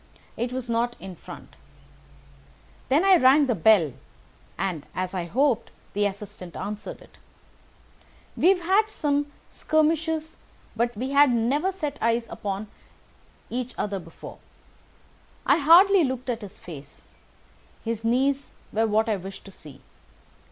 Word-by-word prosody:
It 240 +2 -2
was 255 -1 -4
not 235 +1 0
in 190 -1 -8
front. - - -12 1.3
Then 300 +8 +3
I 385 -2 +7
rang 280 +1 +6
the 250 - +1
bell, 180 - +4 0.6
and, 175 -5 -2
as 185 0 -3
I 180 -2 -2
hoped, 245 - +1 0.2
the 205 0 +2
assistant 195 -3 -9
answered 210 +2 -6
it. - - -21 1.2
We - - +2
have 380 -2 +3
had 390 +5 +3
some 290 -6 -1 0.2
skirmishes, 315 0 0 0.4
but 235 0 -1
we 260 +4 -3
had 280 -1 +6
never 265 +10 +1
set 300 -7 -5
eyes 230 +1 +1
upon 200 +1 -4 0.9
each 250 0 -4
other 200 -2 -2
before. 165 -2 -12 1.1
I - - +4
hardly 360 +5 +7
looked 260 -2 -2
at 230 -1 -4
his 205 -2 -10
face. 145 -5 -12 0.8
His 225 -1 -3
knees 265 +4 +1 0.2
were 225 +1 +2
what 220 +1 +2
I 215 -2 +1
wished 190 +1 -9
to 195 - -11
see. 145 -7 -13
235 Hz, 135 wpm, -25 LUFS, 200-290 Hz, 1.3 s, I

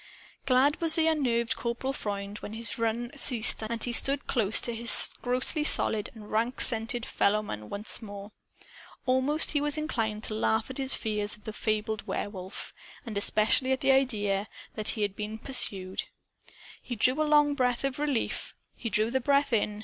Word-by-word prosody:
Glad 275 +4 +2
was 325 -1 +6
the 320 - +2
unnerved 250 -7 0
Corporal 240 +3 -3
Freund 200 -3 -5
when 210 - -9
his 230 0 -4
run 230 +1 -2
ceased 235 -5 +4
and 230 +1 -5
he 240 - -3
stood 275 +3 +3
close 220 -4 +2
to 235 - -1
his 230 +1 +7
grossly 255 +5 0
solid 220 -7 +4
and 210 -2 -12
rank 230 +4 -1
scented 230 0 +1
fellowmen 200 - -1
once 210 +4 -4
more. 205 -1 -9 0.7
Almost 260 +4 +1
he 290 - 0
was 295 0 0
inclined 225 -8 -3
to - - -3
laugh 220 +2 -1
at 260 - -8
his 265 0 +2
fears 210 -2 -2
of 210 - -25
the 215 - -7
fabled 215 0 -3
Werewolf 190 -1 -6 0.3
and 225 -3 -7
especially 215 +5 +1
at 260 - -1
the 270 - +3
idea 210 -7 0 0.3
that 215 -1 -3
he 215 - -1
had 200 -1 -3
been 210 +1 -6
pursued. 195 -7 0 0.8
He 245 - -6
drew 255 +6 +1
a - - +3
long 295 -1 +3
breath 250 -3 -1
of 275 0 -3
relief. 290 -5 -3 0.2
He 230 - -5
drew 215 +1 0
the 265 +1 0
breath 280 0 +1
in. 210 -1 -1
230 Hz, 180 wpm, -27 LUFS, 215-265 Hz, 0.8 s, his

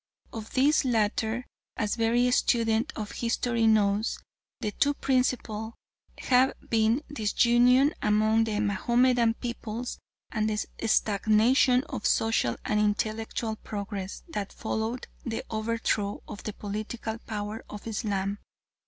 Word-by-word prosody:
Of 220 -1 -7
these 290 +5 +4
latter, 225 0 0 0.3
as 210 +2 -1
every 240 +2 +3
student 230 0 +2
of 210 -2 -5
history 230 0 0
knows, 210 0 +2 0.4
the 210 - -2
two 285 +7 +1
principal 240 -5 -1 0.4
have 255 +1 +3
been 225 +5 +2
disunion 245 +4 +4
among 215 +1 +3
the 210 -2 -1
Mahomedan 235 +3 +2
peoples 235 0 -5 0.3
and 215 -1 0
the 215 - -1 0.3
stagnation 220 +5 +3
of 210 - -3
social 225 - +2
and 210 - +1
intellectual 220 +1 -1
progress 200 -2 -6
that 205 -10 -4
followed 220 +2 -3 0.2
the 225 -2 -3
overthrow 220 -2 -1
of 205 - -8
the 215 - -3
political 215 +2 -5
power 210 0 -5
of 210 - -9
Islam. 205 -3 -2
220 Hz, 120 wpm, -28 LUFS, 210-240 Hz, 0.4 s, these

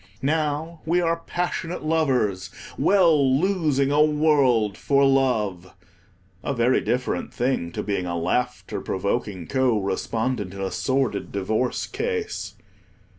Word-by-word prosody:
Now 155 +2 -1
we 170 +2 +1
are 165 -1 0
passionate 175 -1 -3
lovers, 130 -12 +1 0.3
well 155 -9 +4
losing 155 -7 +1
a 145 +1 +4
world 145 -9 +3
for 140 +3 +2
love—a 95 -5 -2
very 120 +2 +3
different 125 +1 -2
thing 120 -9 -1
to - - -3
being 100 -3 -2
a 85 0 -2
laughter 125 +8 -2
provoking 100 -2 -2
co 130 -1 +1
respondent 105 +1 -2
in 100 - -6
a 95 - -2
sordid 130 -6 -1
divorce 110 +5 -1
case. 450 -1 -3
130 Hz, 120 wpm, -24 LUFS, 100-155 Hz, 0.3 s, well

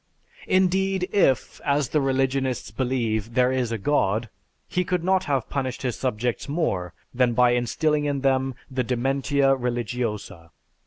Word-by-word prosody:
Indeed 190 0 +2
if, 135 -11 +1
as 140 -2 +1
the 150 - +1
religionists 135 -2 0
believe, 115 -2 -1
there 125 0 +4
is 125 -3 -1
a 115 - -1
god, 110 -2 0 0.4
he 180 - 0
could 180 -1 -1
not 190 +1 +2
have 135 -7 0
punished 130 -3 -3
his 125 -3 -1
subjects 125 0 -2
more 95 - -1 0.2
than 125 -1 +2
by 125 +1 +4
instilling 150 +5 +1
in 140 -2 -1
them 135 -1 +1 0.2
the 130 -1 0
"dementia 135 +3 +1
religiosa." 120 -7 -3
130 Hz, 145 wpm, -24 LUFS, 120-145 Hz, 0.4 s, there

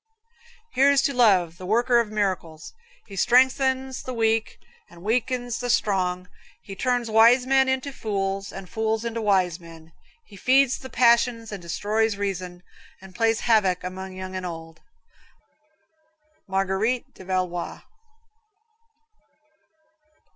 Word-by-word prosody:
Here's 275 +1 +4
to 280 - 0
Love, 185 -9 +3
the 185 - -8
worker 240 +3 +3
of 230 -2 -1
miracles. 185 -6 -3 0.3
He 200 - -11
strengthens 260 +4 +2
the 255 - -6
weak 225 -1 0 0.3
and 170 - -15
weakens 245 +2 -1
the 245 - -4
strong; 180 -5 0 0.4
he 195 - -9
turns 245 0 -1
wise 235 +3 +5
men 265 0 +3
into 265 +1 -2
fools 195 -3 -3
and 195 -1 -9
fools 220 +1 -2
into 230 0 -3
wise 190 -5 +1
men; 165 -1 -14 0.3
he - - -16
feeds 260 +5 +3
the 260 - -10
passions 235 -2 +2
and 200 -3 -6
destroys 210 +5 -1
reason, 185 -3 -5 0.4
and 190 -1 -14
plays 225 +3 +1
havoc 200 -6 +2
among 190 +1 -6
young 185 0 -7
and 185 - -4
old! 165 -2 -8 1.7
Marguerite 195 +5 -1
de - - -13
Valois. 185 -2 -3
215 Hz, 125 wpm, -24 LUFS, 185-245 Hz, 1.7 s, wise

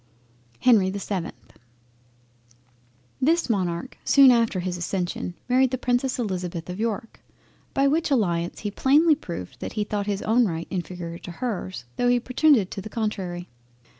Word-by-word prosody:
HENRY 215 -7 +5
the 195 - -4
7th 195 -3 -3 1.9
This 320 -1 +2
Monarch 180 +2 -2
soon 275 -2 +7
after 230 -5 +2
his 180 0 -3
accession 175 0 -3
married 255 +1 +4
the 255 - -2
Princess 250 +1 0
Elizabeth 180 -6 -3
of 180 - -7
York, 225 0 -3 0.5
by 275 0 +4
which 315 +3 +1
alliance 175 -10 0
he 205 - -3
plainly 300 +9 +4
proved 170 - -6
that - - -5
he 215 - 0
thought 205 -1 -3
his 200 -1 -2
own 230 +2 +3
right 165 -2 -4
inferior 175 -2 -5
to - - -8
hers, 190 - -4
tho' 245 - +2
he 245 0 +4
pretended 255 - +3
to 195 - -5
the 215 - -8
contrary. 190 -6 -3
210 Hz, 155 wpm, -25 LUFS, 180-250 Hz, 1.9 s, soon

